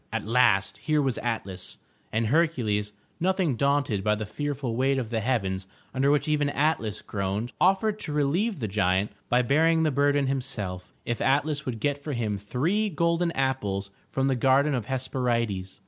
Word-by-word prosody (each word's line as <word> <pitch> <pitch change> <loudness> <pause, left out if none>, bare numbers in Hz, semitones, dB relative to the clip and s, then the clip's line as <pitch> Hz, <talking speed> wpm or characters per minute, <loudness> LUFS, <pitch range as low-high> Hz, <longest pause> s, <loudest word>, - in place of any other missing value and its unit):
At 115 -2 -3
last, 95 -4 +3
here 150 +7 +1
was 135 -4 0
Atlas, 100 -6 -3 0.3
and 110 +1 0
Hercules, 110 -8 +1 0.3
nothing 185 -5 +1
daunted 140 -6 +1
by 105 +1 +2
the 105 0 -4
fearful 135 +1 -3
weight 135 +2 +2
of 120 -4 -3
the 115 - 0
heavens 95 -6 -1 0.3
under 135 +2 +2
which 145 +1 +2
even 150 -2 +2
Atlas 140 -8 0
groaned, 100 +4 -3
offered 200 +3 +3
to 155 - -5
relieve 150 - 0
the 110 - -1
giant 95 0 +1 0.2
by 125 +1 +3
bearing 160 +5 +3
the 155 - +2
burden 140 +1 +2
himself, 105 -9 -3
if 120 -2 -2
Atlas 145 +1 +1
would 120 -3 -3
get 145 +4 0
for 150 - -3
him 110 -5 -2
three 165 - 0
golden 170 0 +1
apples 105 -8 -1 0.2
from 135 0 0
the 135 - +2
Garden 135 +4 +3
of 120 -5 -1
the - - -16
Hesperides. 120 -7 -1
130 Hz, 175 wpm, -26 LUFS, 105-145 Hz, 0.3 s, last